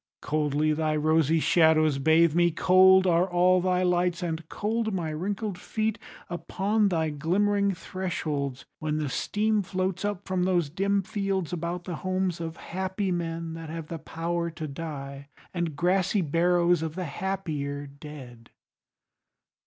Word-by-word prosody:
Coldly 150 Hz, 0 st, +1 dB
thy 155 Hz, 0 st, 0 dB
rosy 155 Hz, +1 st, +3 dB
shadows 155 Hz, -3 st, +4 dB
bathe 160 Hz, +2 st, +4 dB
me, 175 Hz, +1 st, +4 dB
cold 185 Hz, +2 st, +5 dB
Are 180 Hz, +1 st, +3 dB
all 180 Hz, +1 st, +4 dB
thy 180 Hz, 0 st, +1 dB
lights, 180 Hz, 0 st, +1 dB
and 160 Hz, -1 st, -4 dB
cold 220 Hz, +1 st, -1 dB
my 165 Hz, -4 st, -2 dB
wrinkled 195 Hz, +4 st, -3 dB
feet 220 Hz, +3 st, -2 dB, 0.3 s
Upon 200 Hz, +4 st, 0 dB
thy 160 Hz, -3 st, 0 dB
glimmering 200 Hz, +6 st, +1 dB
thresholds, 155 Hz, -7 st, -3 dB
when 155 Hz, -1 st, -1 dB
the 150 Hz, -2 st, -1 dB
steam 210 Hz, +9 st, 0 dB
Floats 185 Hz, 0 st, -2 dB
up 205 Hz, -3 st, -3 dB
from 185 Hz, -1 st, 0 dB
those 175 Hz, -5 st, +1 dB
dim 195 Hz, +3 st, +1 dB
fields 195 Hz, -4 st, -2 dB
about 170 Hz, +1 st, -3 dB
the 175 Hz, -3 st, -5 dB
homes 185 Hz, -1 st, -1 dB
Of 165 Hz, 0 st, -5 dB
happy 190 Hz, +2 st, -3 dB
men 165 Hz, -1 st, -3 dB
that 165 Hz, -1 st, -7 dB
have 165 Hz, -1 st, -6 dB
the 165 Hz, -, -5 dB
power 170 Hz, +2 st, -3 dB
to 165 Hz, -1 st, -6 dB
die, 140 Hz, -2 st, -7 dB, 0.2 s
And 170 Hz, -4 st, -2 dB
grassy 185 Hz, +4 st, +2 dB
barrows 175 Hz, +2 st, +2 dB
of 160 Hz, -1 st, -4 dB
the 185 Hz, -1 st, -3 dB
happier 150 Hz, -5 st, -3 dB
dead. 140 Hz, -5 st, -11 dB
170 Hz, 145 wpm, -27 LUFS, 155-185 Hz, 0.3 s, cold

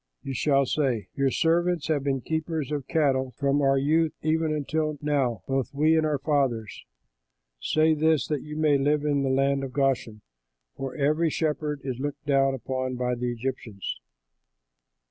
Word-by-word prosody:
you 135 Hz, -, -4 dB
shall 135 Hz, +3 st, +2 dB
say, 130 Hz, -6 st, -1 dB
'Your 140 Hz, -1 st, +1 dB
servants 170 Hz, +2 st, +1 dB
have 150 Hz, -3 st, 0 dB
been 135 Hz, -2 st, 0 dB
keepers 160 Hz, -1 st, -3 dB
of 145 Hz, -3 st, -3 dB
cattle 135 Hz, -4 st, +1 dB
from 140 Hz, +1 st, +1 dB
our 135 Hz, 0 st, +3 dB
youth 155 Hz, +3 st, +2 dB
even 160 Hz, 0 st, +1 dB
until 155 Hz, 0 st, -1 dB
now, 135 Hz, -, 0 dB
both 135 Hz, 0 st, -2 dB
we 155 Hz, +3 st, +4 dB
and 160 Hz, -1 st, +2 dB
our 150 Hz, -1 st, 0 dB
fathers.' 135 Hz, -7 st, -1 dB, 0.8 s
Say 155 Hz, +1 st, +3 dB
this 155 Hz, -3 st, +2 dB
that 150 Hz, -3 st, -2 dB
you 150 Hz, 0 st, -8 dB
may 150 Hz, -3 st, +3 dB
live 145 Hz, +2 st, +1 dB
in 145 Hz, -1 st, +1 dB
the 135 Hz, -, 0 dB
land 135 Hz, +1 st, +1 dB
of 130 Hz, -2 st, -6 dB
Goshen, 130 Hz, -5 st, 0 dB, 0.5 s
for 135 Hz, -1 st, -5 dB
every 155 Hz, +3 st, +2 dB
shepherd 150 Hz, -2 st, -2 dB
is 130 Hz, -2 st, -4 dB
looked 145 Hz, +2 st, -4 dB
down 135 Hz, -1 st, +3 dB
upon 130 Hz, 0 st, -3 dB
by 125 Hz, 0 st, -1 dB
the 125 Hz, 0 st, -2 dB
Egyptians." 120 Hz, -5 st, -5 dB
140 Hz, 165 wpm, -26 LUFS, 130-155 Hz, 0.8 s, we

